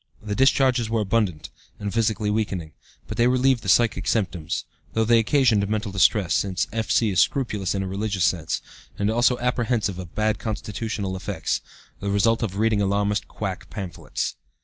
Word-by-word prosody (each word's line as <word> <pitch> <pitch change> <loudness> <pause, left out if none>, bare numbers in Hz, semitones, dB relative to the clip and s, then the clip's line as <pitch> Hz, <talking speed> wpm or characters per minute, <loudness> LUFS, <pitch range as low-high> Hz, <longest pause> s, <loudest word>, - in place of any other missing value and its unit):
The 105 -1 -4
discharges 130 -1 +3
were 115 -1 +1
abundant 100 -6 -1 0.3
and 100 -1 -4
physically 110 -2 +1
weakening, 95 -7 -2 0.4
but - - -6
they 120 - +4
relieved 130 -1 +3
the 100 - -4
psychic 100 0 +3
symptoms, 90 -6 -1 0.3
though 110 0 +2
they 115 +1 +5
occasioned 110 -4 +3
mental 110 -1 -1
distress, 95 -1 +3
since 95 +1 0
F.C. 110 -1 +1
is 90 - +1
scrupulous 105 -9 +1
in 95 - -1
a - - -3
religious 100 -1 -1
sense, 80 -4 -1 0.3
and 100 +1 +1
also 120 +2 +3
apprehensive 120 -6 0
of 90 -3 -9
bad 110 0 +1
constitutional 105 -2 -3
effects, 95 - -2 0.4
the 100 - -3
result 115 +3 +2
of 100 -4 -2
reading 110 -1 +2
alarmist 100 +1 0
quack 95 -3 -5
pamphlets. 95 -6 -4
105 Hz, 165 wpm, -24 LUFS, 95-115 Hz, 0.4 s, they